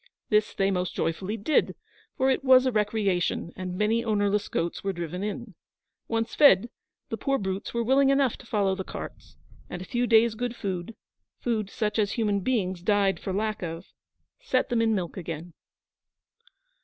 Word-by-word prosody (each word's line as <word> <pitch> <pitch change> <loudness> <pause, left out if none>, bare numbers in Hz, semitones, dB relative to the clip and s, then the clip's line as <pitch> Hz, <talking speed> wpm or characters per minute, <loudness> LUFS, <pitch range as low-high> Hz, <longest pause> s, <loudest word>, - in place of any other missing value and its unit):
This 215 -1 +2
they 195 0 +2
most 180 -1 -2
joyfully 190 +6 -2
did, 260 +9 +1 0.4
for 265 +1 +3
it 265 - 0
was 260 -1 +6
a 255 - +2
recreation, 205 -6 0
and 185 -1 -5
many 220 +3 +2
ownerless 210 -2 +1
goats 170 +1 -2
were 195 0 -1
driven 175 +1 -5
in. 210 +1 -5 0.5
Once 225 0 -1
fed, 240 -6 +6 0.4
the 225 - -3
poor 275 +3 0
brutes 190 -1 -3
were 235 0 -1
willing 270 +3 +4
enough 275 -3 +3
to - - -15
follow 200 -4 +1
the 190 0 -4
carts, - - -9 0.3
and 180 - -5
a 185 - -7
few 240 +3 -1
days' 225 0 +5
good 245 +2 -3
food 190 +1 -4 0.4
food 220 -4 -1
such 210 0 -1
as 205 -2 +1
human 210 -4 +1
beings 190 -5 -1
died 200 0 +2
for 190 - -4
lack 215 +2 -1
of 165 0 -6 0.5
set 270 - 0
them 235 -2 +2
in 225 -1 +2
milk 180 -3 -3
again. 165 -1 -6
210 Hz, 175 wpm, -27 LUFS, 190-235 Hz, 0.5 s, was